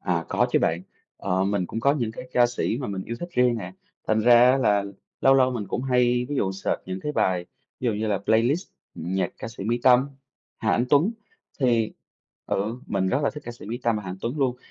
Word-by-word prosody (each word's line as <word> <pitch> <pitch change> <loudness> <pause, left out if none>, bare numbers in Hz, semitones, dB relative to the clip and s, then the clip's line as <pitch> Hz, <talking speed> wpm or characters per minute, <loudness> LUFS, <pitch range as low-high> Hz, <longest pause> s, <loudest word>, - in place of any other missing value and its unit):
À, - - -1
có - - +2
chứ - - +5
bạn, 85 +2 0 0.3
ờ, 95 0 0
mình 100 -2 0
cũng 115 - -4
có 140 +4 +4
những 120 -6 -2
cái 125 - -9
ca 120 -1 +5
sĩ 120 -1 -2
mà 130 - -3
mình 95 -2 -4
yêu 115 - -5
thích 175 - -5
riêng 125 -5 +3
nè, - - -7 0.3
thành 110 0 +2
ra 120 +2 +7
á 135 - +3
là 105 -5 +2 0.4
lâu 135 - +5
lâu 130 -1 +4
mình 115 -5 -4
cũng - - -2
hay 125 -1 +2
ví 145 - -2
dụ 95 -6 0
search 95 - -2
những 95 0 -4
cái 150 - -3
bài, 90 -9 0 0.3
ví - - -6
dụ 115 - +2
như 105 +1 -2
là 105 -2 +1
"Playlist 115 - +1 0.3
nhạc 95 +4 -2
ca - - -6
sĩ 115 -4 -8
Mỹ 120 +3 0
Tâm, 130 +2 +5 0.5
Hà - - 0
Anh 120 - +2
Tuấn" 155 +10 +4 0.5
thì 120 -4 +2 0.5
ừ, 110 +5 -2
mình 95 -2 0
rất 130 - +1
là - - +2
thích 150 - -9
ca 120 - -5
sĩ 120 - -12
Mỹ 115 +3 -4
Tâm 115 -2 +2
và 105 - -4
Hà 95 - -6
Anh 90 - -6
Tuấn 120 +6 -3
luôn, 130 -3 +1
120 Hz, 250 wpm, -25 LUFS, 100-125 Hz, 0.5 s, ra